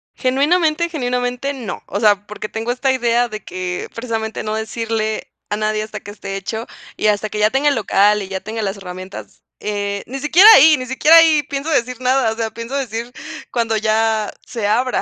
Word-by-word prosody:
Genuinamente, 305 +5 +1
genuinamente 250 -2 -2
no, 245 -7 -6
o 200 - -3
sea, 205 -2 +3
porque 210 0 -6
tengo 225 +2 -3
esta 255 +2 0
idea 240 -1 +1
de 215 -2 -7
que 180 -1 -5
precisamente 225 -2 -4
no 215 - -3
decirle 220 0 -3 0.2
a 210 - -1
nadie 215 0 -1
hasta 215 -1 -6
que 205 - -9
esté 195 -1 -7
hecho 220 +4 -5 0.3
y - - +1
hasta 210 0 +1
que 210 - -5
ya 210 +1 +4
tenga 275 +4 +2
el 285 - +1
local 210 -1 +3
y 195 - -6
ya 190 0 -4
tenga 220 +3 -5
las 200 -1 -3
herramientas, 185 0 -9 0.2
eh, 200 -1 -3
ni 270 +3 -5
siquiera 325 +8 +6
ahí 310 +2 +7
ni 255 - -5
siquiera 280 +6 +5
ahí 320 -2 +6
pienso 280 +3 -4
decir 255 -4 0
nada, 255 -2 +2
o - - -5
sea, 225 -1 -3
pienso 230 +3 -6
decir 235 -3 -3 0.4
cuando 230 -2 0
ya 220 0 +1
se 225 -4 -3
abra 245 +4 +1
225 Hz, 200 wpm, -18 LUFS, 210-260 Hz, 0.4 s, ahí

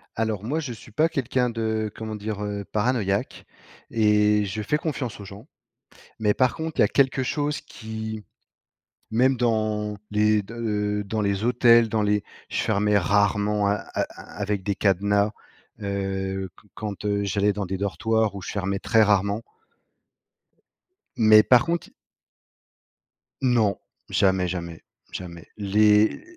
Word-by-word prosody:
Alors 110 -2 -1
moi, 145 +8 -1
je 140 -6 -4
suis 115 +1 -14
pas 155 +9 +2
quelqu'un 130 -4 0
de, 110 -2 -2
comment 110 -1 -5
dire? 105 0 -5
Heu, 100 -1 -4
paranoïaque 105 -3 -1 0.5
et 105 -1 +3
je 100 +2 -4
fais 150 +8 0
confiance 145 -8 -4
aux 100 - -8
gens. 100 +6 -12 0.7
Mais 105 -1 +2
par 130 +1 +2
contre, 160 0 -4
il - - +6
y - - +7
a - - +1
quelque 135 -1 +2
chose 145 +3 -2
qui 110 -4 -7 0.9
même 130 +4 +3
dans 110 -3 0
les 105 0 +3
de 105 - -11 0.5
heu - - -3
dans 105 +2 -2
les 100 0 0
hôtels, 120 -1 +5
dans 110 -1 0
les 105 0 +1 0.3
je - - -1
fermais 105 +1 +2
rarement 100 +1 +2
a 100 - +3 0.2
a - - 0 0.4
avec 100 -1 -1
des 100 +1 -1
cadenas, 100 +2 +2 0.5
heu, 95 -1 -3
qu 105 - -21
quand, 105 -1 -6
heu, 100 0 0
j'allais 100 +1 +1
dans 100 0 -3
des 95 +1 -3
dortoirs 110 +2 0
ou 100 - -6
je - - -6
fermais 100 -1 -2
très 115 -2 +3
rarement. 100 0 +2 1.8
Mais 110 -1 +7
par 125 +2 +5
contre 170 0 -2 1.5
Non, 120 -6 +2 0.3
jamais, 95 -2 +2
jamais, 85 -2 -5 0.3
jamais. 85 -2 -8
Les 105 +1 +3
105 Hz, 150 wpm, -24 LUFS, 100-115 Hz, 1.8 s, y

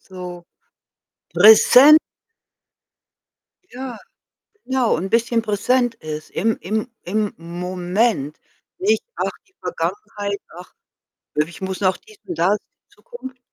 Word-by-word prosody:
So 180 -2 -9 0.9
präsen 230 - +8 1.7
Ja, 250 -2 -7 0.7
genau 260 -2 +1
und 185 +4 -3
bisschen 230 +1 +2
präsent 230 +3 +1
ist 155 -7 -7
im 225 0 0
im 215 +7 -2 0.2
im 210 +3 -1
Moment. 180 - -2 0.4
Nicht: 215 +3 +1
„Ach - - -1 0.2
die 380 - -33
Vergangenheit, 205 - -4 0.2
ach, 180 - -12 0.6
ich 150 +3 -2
muss 190 0 -4
noch 185 -1 +2
dies 430 -1 -19
und 355 -3 -6
das, 195 +4 +3 0.3
Zukunft.“ 370 - -11
210 Hz, 105 wpm, -21 LUFS, 180-245 Hz, 1.7 s, präsen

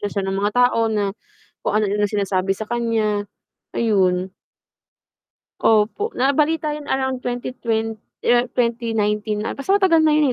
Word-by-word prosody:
na 205 - -2
siya 200 -1 -3
ng 195 - -2
mga 205 - +1
tao 235 -2 +3
na 205 -2 0 0.5
kung 210 - +1
anu-ano 205 0 +1
sinasabi 195 -2 0
sa 220 - -4
kanya. 220 -4 0 0.5
Ayon. 185 -4 +1 1.3
Opo, 220 - +2
nabalita 300 +3 +1
yun 295 -1 -7
around 265 -1 -1
twenty 245 0 -4
twen 225 -1 -1 0.2
year 240 +1 +3
2019 220 -3 0
'ata, 275 - -4
basta 390 +7 +2
matagal 370 -5 +4
na 310 -1 +4
yun 290 -4 +3
225 Hz, 145 wpm, -21 LUFS, 205-255 Hz, 1.3 s, matagal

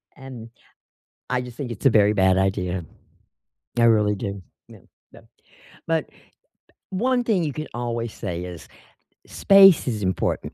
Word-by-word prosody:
And 125 -4 -11 0.8
I 125 0 0
just 125 -1 -9
think 135 -5 -6
it's 115 +5 -5
a - - +7
very 105 -2 +4
bad 95 -2 +3
idea. 95 -2 -1 0.9
I 115 - +4
really 105 -2 +3
do. 100 -1 -6 0.3
Yeah, - - -14 0.3
yeah. - - -15 0.7
But, 165 -2 -1 0.8
one 245 +6 0
thing 205 -7 +1
you 150 - -3
can 155 +2 -6
always 120 -1 -4
say 90 -4 -5
is 90 -2 -9 0.6
space 195 -3 +6
is 110 -5 -3
important. 95 -3 -2
115 Hz, 140 wpm, -23 LUFS, 95-140 Hz, 0.9 s, a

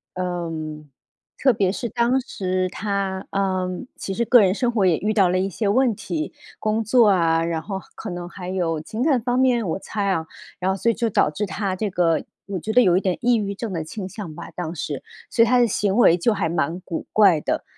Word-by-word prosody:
嗯， 165 -4 -4 0.5
特 265 -2 +4
别 195 -4 +1
是 240 +4 -3
当 240 +3 +2
时 185 -6 -2
她， 195 -1 -3
呃， 190 -2 0 0.3
其 195 - -5
实 235 - 0
个 245 0 +7
人 190 -2 +3
生 245 +1 +1
活 215 -5 +1
也 170 -3 +3
遇 215 +2 -1
到 195 -4 +4
了 180 - +1
一 190 +1 +1
些 200 +4 -2
问 245 +3 +3
题， 315 +10 -4 0.2
工 215 +1 0
作 225 0 +5
啊， 165 -4 +3
然 165 -1 -2
后 195 +3 -5 0.2
可 220 - -6
能 175 -1 -5
还 180 0 -8
有 170 -4 -1
情 220 +8 -4
感 275 -5 +3
方 245 +2 0
面， 250 -5 +2
我 - - -1
猜 200 0 -3
啊， 165 -4 0 0.3
然 185 +1 +1
后 - - -1
所 230 - +1
以 230 - +1
就 230 -1 -1
导 200 -6 +3
致 175 +8 -3
她 200 -1 -2
这 210 +2 -2
个， 170 -3 +2 0.2
我 200 -1 -3
觉 215 - -3
得 250 - +6
有 180 -6 +4
一 - - +1
点 185 -3 0
抑 245 0 +3
郁 200 -2 -2
症 220 +1 -5
的 165 -2 -2
倾 190 +4 -6
向 190 -5 -7
吧， 170 - -8
当 170 -2 -4
时。 145 -3 -4 0.3
所 230 - +4
以 - - +2
她 250 +2 +4
的 240 - +4
行 200 -2 0
为 180 -8 +6
就 215 +6 +2
还 165 -5 -1
蛮 165 +1 -1
古 175 -2 -5
怪 195 -7 +5
的， - - -1
195 Hz, 255 characters per minute, -22 LUFS, 175-225 Hz, 0.5 s, 个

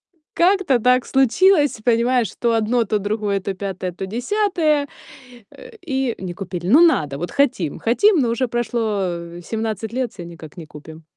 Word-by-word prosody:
Ну. 320 - -42
Как-то 355 -7 +3
так 250 +1 +3
случилось, 290 - +3
понимаешь, 240 -1 +2
то 235 -1 +1
одно, 225 +1 +1
то 215 - 0
другое, 205 -1 -2
то 195 - -3
пятое, 190 -1 -5
то 185 +2 -6
десятое, 305 - 0 0.6
э. - - -13
И 265 -5 -1
не 185 -2 -6
купили. 180 -2 -6
Ну 260 +11 +6
надо, 155 - +3
вот 175 +4 -5
хотим 240 - 0
хотим, 365 - +3
но 245 -4 +1
уже 235 +2 0
прошло, 240 0 -2 0.6
э, - - -11
17 220 +1 -4
лет, 250 -1 -3
всё 180 - -9
никак 165 -3 -11
не 165 - -8
купим. 155 +2 -13
230 Hz, 170 wpm, -20 LUFS, 190-270 Hz, 0.6 s, Ну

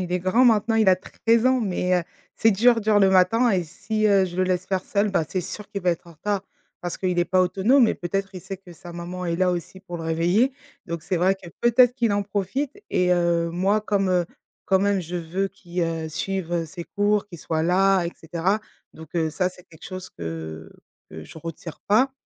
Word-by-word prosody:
Il 180 -1 -4
est 180 - +2
grand 205 +8 +3
maintenant, 225 -1 +3
il 220 -3 +4
a 185 - +6
13 230 +5 +1
ans. 260 0 +3
Mais, 185 -3 0
heu, - - -2 0.3
c'est 225 - +4
dur, 230 +3 +4
dur 210 -1 +3
le 195 -1 +5
matin 190 +6 +4
et 185 -4 +2
si, 215 +6 -2
heu, 195 -2 +4
je 175 -1 -6
le 185 - +2
laisse 185 0 -1
faire 190 -2 -1
seul, 205 +1 0
bah, 165 - +1
c'est 185 - -1
sûr 205 +4 -8
qu'il 200 -2 -5
va 180 - +3
être 170 0 -4
en 170 - -13
retard. 200 +5 -2 0.4
Parce 175 -1 -4
qu'il 180 -2 -1
est 175 - +4
pas 185 +1 +2
autonome 215 +8 +4
et - - 0
peut-être, 195 +3 -3
il 180 - -6
sait 190 +1 -7
que 185 -2 -14
sa 175 +1 -11
maman 175 +1 -6
est 170 - -1
là 185 0 +2
aussi 180 +2 -5
pour 175 -2 -7
le 165 - -6
réveiller. 175 +11 +2 0.3
Donc 170 -2 -4
c'est 185 +1 -1
vrai 185 +3 +3
que, 190 - -13
peut-être 240 +1 +5
qu'il 235 -5 +1
en 205 - +1
profite 205 +7 -2 0.2
et 180 0 +2
heu, 170 -1 +1
moi 195 +5 +1
comme, 200 -2 0
heu, 180 -1 +2 0.4
quand 190 - +4
même 200 0 +1
je 175 +1 -5
veux 175 +4 -2
qu'il, 175 -1 -6
heu, 165 -1 -2
suive 175 0 -2
ses 170 +1 -8
cours, 205 0 0
qu'il 175 -4 -11
soit 160 0 -2
là 190 +1 +3
et 170 - -3
cetera. 170 +6 -1 0.3
Donc, 160 +2 -13
heu, 160 -2 +1
ça 180 +3 0
c'est 180 -1 -16
quelque 160 - -16
chose 185 -1 -7
que 80 -1 -7 0.4
que 80 0 -9
je - - -12
retire 165 0 -8
pas. 255 +6 +4
185 Hz, 235 wpm, -24 LUFS, 170-205 Hz, 0.4 s, a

